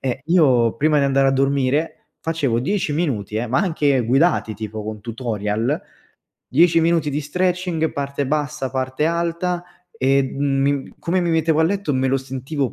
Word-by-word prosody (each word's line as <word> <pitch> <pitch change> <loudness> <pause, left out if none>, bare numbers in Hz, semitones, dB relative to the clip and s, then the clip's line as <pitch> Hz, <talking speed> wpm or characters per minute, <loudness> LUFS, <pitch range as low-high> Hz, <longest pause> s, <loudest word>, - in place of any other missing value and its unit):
e 130 0 -2
io 130 -10 +4
prima 150 +3 +2
di 140 - +2
andare 135 0 +3
a - - +4
dormire 135 +3 0
facevo 145 -8 0
10 160 +3 -1
minuti 115 - -2
eh, 120 +2 -1
ma 125 +7 +1
anche 150 -8 +1
guidati, 130 -3 +2
tipo 110 0 -6
con 110 0 -6
tutorial, 115 +2 -2 0.7
10 165 +4 +4
minuti 165 -2 +2
di 145 +2 -1
stretching, 180 +1 -1
parte 140 0 -3
bassa, 150 -2 -2
parte 130 +2 -2
alta, 170 +1 -1 0.4
e 135 +1 +4
m 140 +1 0
come 180 +2 0
mi 170 -1 0
mettevo 160 -1 +2
a - - +5
letto, 195 -2 0
me 130 0 +1
lo 135 - +2
sentivo 135 +1 -3
140 Hz, 165 wpm, -21 LUFS, 130-165 Hz, 0.7 s, a